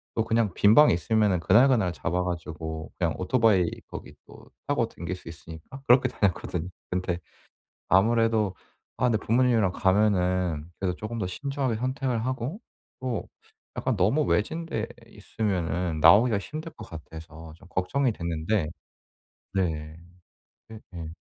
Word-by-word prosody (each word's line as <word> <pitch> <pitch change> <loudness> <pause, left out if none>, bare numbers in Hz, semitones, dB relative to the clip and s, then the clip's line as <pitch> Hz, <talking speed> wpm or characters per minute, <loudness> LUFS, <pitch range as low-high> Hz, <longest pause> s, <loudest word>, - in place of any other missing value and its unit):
또 115 - +2
그냥 110 -5 +1
빈 105 +2 +5
방이 150 - +7
있으면은 105 +1 +2
그날 110 +10 +5
그날 110 -9 +2
잡아 90 +2 -1
가지고 80 -2 -5
그냥 85 -2 +1
오토바이 95 -2 +3 0.2
거기 - - -9
또 - - -14 0.2
타고 140 -6 +1
다닐 85 -4 -6
수 90 - -15
있으니까 85 - -10
그렇게 125 +1 +6
다녔거든요. 90 -5 -1 0.2
근데 90 -1 -1 0.7
아무래도 110 0 +3 0.4
아 125 - +1
근데 110 - +2
부모님이랑 115 -5 +3
가면은 90 -5 +1
그래도 90 -3 -1
조금 115 +2 -5
더 95 - -2
신중하게 135 +3 -2
선택을 130 -1 -1
하고 130 - -3 0.4
또 125 -4 -3 0.5
약간 130 - 0
너무 110 +12 +2
외진 160 +9 0
데 115 -9 -2 0.2
있으면은 90 -6 -2
나오기가 105 +7 +6
힘들 155 - -7
것 - - -11
같아서 80 0 -10
좀 95 +1 -18
걱정이 125 +8 0
됐는데. 85 0 -1 0.9
네. 80 -4 -2 0.7
네 110 -1 -9
네. 85 -2 -6
100 Hz, 310 characters per minute, -26 LUFS, 85-115 Hz, 0.9 s, 방이